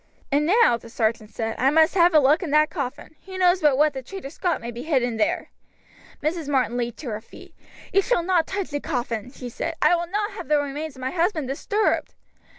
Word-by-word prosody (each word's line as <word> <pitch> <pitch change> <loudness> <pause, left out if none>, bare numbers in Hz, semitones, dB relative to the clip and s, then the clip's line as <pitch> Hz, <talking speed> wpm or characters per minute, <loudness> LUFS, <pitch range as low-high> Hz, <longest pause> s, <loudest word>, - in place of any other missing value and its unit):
"And 290 +2 +2
now," 410 - +4
the 230 - -14
sergeant 220 -1 -1
said, 225 0 -4
"I 260 +3 +4
must 315 +3 +4
have 350 -2 +4
a - - +9
look 295 +5 +4
in 350 - -4
that 305 +1 +3
coffin. 280 -2 -5
Who 375 -1 -7
knows 365 0 +3
but 290 -3 +4
what 300 0 +3
the 265 - -5
traitor 280 +1 -8
Scot 350 +1 -1
may 235 +1 -6
be 235 +1 -7
hid 275 -3 +1
in 240 -2 -2
there!" 220 - -1 0.7
Mrs. 315 0 -2
Martin 260 -4 +1
leaped 240 -1 -3
to 275 - -5
her 215 0 -4
feet. - - -15 0.4
"You 395 - +5
shall 435 -4 +1
not 345 -2 +2
touch 385 -4 -4
the 290 - -2
coffin," 245 -6 -3
she 255 -2 -8
said; 325 +7 -4
"I - - +4
will 345 0 -3
not 415 +4 -2
have - - -8
the 300 - +3
remains 290 +1 -4
of 260 - -12
my 260 +1 -2
husband 335 -4 0
disturbed." 405 +10 -1
295 Hz, 235 wpm, -24 LUFS, 250-345 Hz, 0.7 s, a